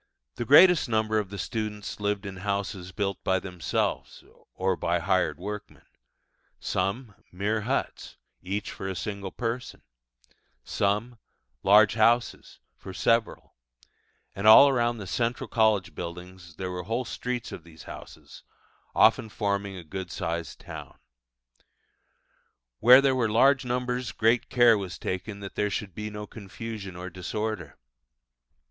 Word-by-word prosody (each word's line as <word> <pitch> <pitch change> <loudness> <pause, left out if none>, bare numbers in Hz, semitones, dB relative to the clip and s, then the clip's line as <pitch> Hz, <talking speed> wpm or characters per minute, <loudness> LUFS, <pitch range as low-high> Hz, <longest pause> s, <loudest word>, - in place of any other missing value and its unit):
The 120 - -4
greatest 165 +1 +7
number 110 -1 +1
of 100 -3 -4
the 100 - -7
students 105 -2 -4
lived 105 -1 -1
in 95 -1 -6
houses 100 -1 -3
built 100 0 -3
by 95 - +2
themselves, 90 -4 -3 0.3
or 95 0 0
by 85 0 0
hired 90 -3 +1
workmen 105 +4 -8 0.7
some, 100 +5 -2 0.2
mere 105 +4 -1
huts, - - -3 0.2
each 100 +3 -4
for 95 - -6
a 95 - -3
single 100 +1 -4
person; 120 +1 -4 0.8
some, 105 +4 -1 0.4
large 105 +2 +6
houses, 115 +2 +1 0.2
for 95 - -10
several: 115 -1 0 0.8
and 100 +2 -1
all 125 +6 +10
around 120 -3 +1
the 105 - -7
central 115 +5 -2
college 110 -5 +2
buildings 90 0 -8
there 90 +2 -4
were 90 0 -4
whole 115 +7 -2
streets 125 0 -4
of 85 - -8
these 80 -2 -14
houses, - - -11 0.5
often 110 - +4
forming 100 -2 -2
a 90 - -8
good 95 +3 -6
sized 85 0 -4
town. - - -9 1.8
Where 125 - +8
there 135 -1 +3
were 120 -4 +1
large 130 +4 +4
numbers 125 0 -2
great 115 +2 +2
care 120 -3 +5
was 95 -3 -6
taken 100 +2 -5
that 100 - -7
there 105 - 0
should 100 -2 -4
be 105 +3 -5
no 105 0 -7
confusion 105 -2 -8
or 90 +1 -7
disorder. 95 -3 -4
105 Hz, 140 wpm, -27 LUFS, 95-115 Hz, 1.8 s, all